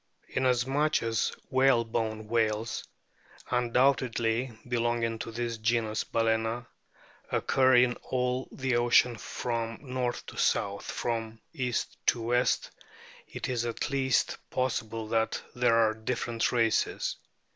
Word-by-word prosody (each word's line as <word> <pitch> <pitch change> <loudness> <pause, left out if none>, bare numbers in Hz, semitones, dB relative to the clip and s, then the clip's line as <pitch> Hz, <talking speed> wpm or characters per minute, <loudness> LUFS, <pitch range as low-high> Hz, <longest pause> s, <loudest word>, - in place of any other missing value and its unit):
Inasmuch 130 +4 +1
as 115 -1 0 0.2
whalebone 115 -4 +2
whales, 110 0 0 0.7
undoubtedly 125 -1 +2 0.2
be 120 0 0
longing 115 -1 0
to 115 - -5
this 115 0 -3
genus 110 -1 0
Balana, 115 +1 0 0.7
occur 130 -1 +3
in 125 0 +5
all 125 0 -2
the 130 -2 0
oceans 120 -1 +4
from 115 -1 -3 0.2
north 125 -1 -2
to - - -10
south, 100 0 +1
from 115 -1 -3
east 125 -4 -2
to - - +4
west, 120 +2 +1 0.6
it - - -5
is 125 -2 -1
at 120 +5 -3
least 130 -2 +1
possible 115 -3 -2
that 115 0 +1
there 120 -2 +3
are 110 -1 +4
different 115 0 -1
races. 115 -3 +1
120 Hz, 115 wpm, -29 LUFS, 115-125 Hz, 0.7 s, in